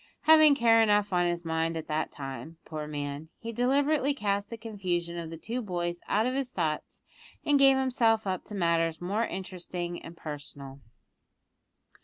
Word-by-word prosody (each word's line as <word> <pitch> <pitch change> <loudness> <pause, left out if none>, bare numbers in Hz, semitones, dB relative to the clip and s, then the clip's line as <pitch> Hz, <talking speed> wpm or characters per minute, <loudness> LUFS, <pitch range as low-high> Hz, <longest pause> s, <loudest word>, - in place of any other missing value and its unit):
Having 310 -2 +7
care 230 -3 +5
enough 205 -2 +3
on 175 0 +3
his 175 0 -2
mind 165 0 0
at 160 - -5
that 155 +1 -1
time, 140 +4 -7
poor 155 -1 -5
man, 145 +1 -5
he 230 - -6
deliberately 280 +4 +2
cast 200 -4 -1
the 230 - -6
confusion 185 -6 -3
of 170 -2 -5
the 165 - -7
two 230 +9 -4
boys 175 -4 -3
out 215 +2 +2
of 255 - 0
his 270 -1 -1
thoughts, 160 -8 -3 0.4
and 290 -1 +4
gave 270 -1 +6
himself 230 -4 +2
up 185 -2 -2
to 210 - -8
matters 165 -3 +1
more 205 +6 -1
interesting 180 -2 -5
and 165 0 -11
personal. 145 -2 -8
185 Hz, 170 wpm, -29 LUFS, 165-230 Hz, 0.4 s, Having